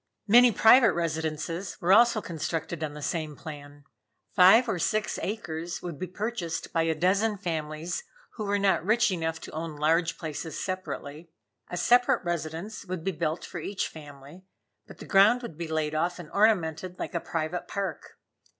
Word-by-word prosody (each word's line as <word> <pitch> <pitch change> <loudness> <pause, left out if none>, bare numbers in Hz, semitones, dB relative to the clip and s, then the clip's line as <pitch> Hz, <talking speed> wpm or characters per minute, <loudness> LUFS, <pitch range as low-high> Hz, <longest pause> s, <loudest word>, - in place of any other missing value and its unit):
Many 240 +3 +7
private 230 +3 +6
residences 160 +2 -3
were 180 +3 +3
also 230 0 +5
constructed 165 0 -4
on 150 -1 -4
the 150 - -8
same 155 -2 -3
plan. 145 -2 -10 0.5
Five 195 +7 +7
or 195 -6 -1
six 210 +6 -1
acres 170 -5 -4
would 170 -5 -6
be 185 - -3
purchased 190 -3 -4
by 165 - +2
a 165 -1 +1
dozen 200 +6 +1
families 160 - -4 0.3
who 215 - -5
were 205 0 +1
not 195 -4 +2
rich 225 +3 +3
enough 165 -2 -2
to - - -9
own 160 0 -5
large 165 +3 +1
places 160 -1 -5
separately. 170 -4 -5 0.4
A 175 - -4
separate 245 +3 +3
residence 170 +5 -4
would 185 -3 -5
be 195 - 0
built 160 0 -3
for 175 - -7
each 195 +5 -3
family, 145 +2 -12 0.5
but - - -13
the - - -10
ground 210 +6 +5
would 170 - -7
be 170 +1 -5
laid 155 -1 -1
off 170 +3 0
and 175 -4 -10
ornamented 185 -4 +1
like - - -5
a 170 - 0
private 165 +2 -3
park. 195 -6 -5
170 Hz, 170 wpm, -27 LUFS, 160-200 Hz, 0.5 s, Many